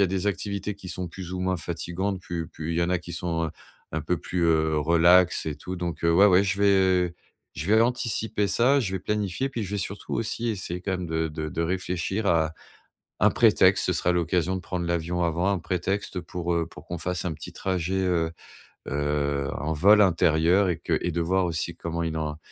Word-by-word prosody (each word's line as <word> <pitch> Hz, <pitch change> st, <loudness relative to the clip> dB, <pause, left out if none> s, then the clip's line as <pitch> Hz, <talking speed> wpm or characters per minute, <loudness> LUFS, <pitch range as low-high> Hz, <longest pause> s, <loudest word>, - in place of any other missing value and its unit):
y 100 Hz, -, +6 dB
a -, -, +2 dB
des 95 Hz, +2 st, -2 dB
activités 100 Hz, 0 st, -2 dB
qui 95 Hz, -2 st, -11 dB
sont 90 Hz, 0 st, -4 dB
plus 90 Hz, +1 st, -8 dB
ou 90 Hz, -, -3 dB
moins 95 Hz, -1 st, 0 dB
fatigantes, 90 Hz, +4 st, -3 dB
pu 85 Hz, -2 st, -5 dB
puis 80 Hz, +1 st, -5 dB
il 85 Hz, -, -1 dB
y -, -, +3 dB
en 85 Hz, -, 0 dB
a 90 Hz, -, +3 dB
qui 85 Hz, 0 st, -9 dB
sont, 85 Hz, -1 st, -2 dB
heu, 80 Hz, -, -3 dB, 0.4 s
un 80 Hz, -, 0 dB
peu 85 Hz, +4 st, -1 dB
plus, 90 Hz, +2 st, -3 dB
heu, 80 Hz, -1 st, +2 dB
relax 85 Hz, +3 st, +4 dB
et 75 Hz, -, -2 dB
tout, 90 Hz, +5 st, -6 dB
donc, 85 Hz, -3 st, -4 dB
heu, 85 Hz, -, +4 dB
ouais, 95 Hz, +4 st, +7 dB
ouais, 95 Hz, -1 st, +5 dB
je 100 Hz, 0 st, -1 dB
vais 95 Hz, -3 st, +3 dB, 0.4 s
je 75 Hz, -, -5 dB
vais 110 Hz, +2 st, +5 dB
anticiper 115 Hz, -4 st, 0 dB
ça, 135 Hz, +7 st, +3 dB
je 100 Hz, -6 st, -2 dB
vais 95 Hz, -, -1 dB
planifier, 105 Hz, +6 st, -2 dB
puis 120 Hz, -4 st, -3 dB
je 95 Hz, -, -5 dB
vais -, -, 0 dB
surtout 100 Hz, +2 st, -4 dB
aussi 115 Hz, +1 st, -2 dB
essayer, 90 Hz, -4 st, -3 dB
quand 95 Hz, -, -3 dB
même, 90 Hz, -1 st, -3 dB
de 80 Hz, 0 st, -1 dB
de 75 Hz, 0 st, -4 dB
de 85 Hz, -, -3 dB
réfléchir 90 Hz, +3 st, -2 dB
à 80 Hz, -3 st, +2 dB, 0.7 s
un -, -, +5 dB
prétexte. -, -, +4 dB
Ce -, -, +1 dB
sera 90 Hz, -, +2 dB
l'occasion 90 Hz, +1 st, 0 dB
de -, -, -4 dB
prendre 90 Hz, -2 st, -4 dB
l'avion 85 Hz, +1 st, -1 dB
avant, 85 Hz, +4 st, +1 dB
un 100 Hz, -, +1 dB
prétexte 90 Hz, +2 st, -2 dB
pour, 85 Hz, 0 st, -3 dB
heu, 85 Hz, -1 st, 0 dB
pour -, -, -14 dB
qu'on 85 Hz, -1 st, -5 dB
fasse 90 Hz, +2 st, -2 dB
un 85 Hz, -, -1 dB
petit 75 Hz, -, -9 dB
trajet, 95 Hz, -1 st, -2 dB
heu 90 Hz, -4 st, +1 dB, 0.6 s
heu, 70 Hz, -1 st, -1 dB
un 80 Hz, +2 st, -1 dB
vol 100 Hz, +7 st, +6 dB
intérieur 85 Hz, +1 st, +3 dB
et 85 Hz, -, 0 dB
que -, -, 0 dB
et 90 Hz, -, 0 dB
de 85 Hz, +1 st, -1 dB
voir 95 Hz, +2 st, +1 dB
aussi 85 Hz, 0 st, -2 dB
comment 85 Hz, 0 st, -4 dB
il 80 Hz, -1 st, -2 dB
en 75 Hz, -1 st, -3 dB
90 Hz, 225 wpm, -26 LUFS, 80-95 Hz, 0.7 s, ouais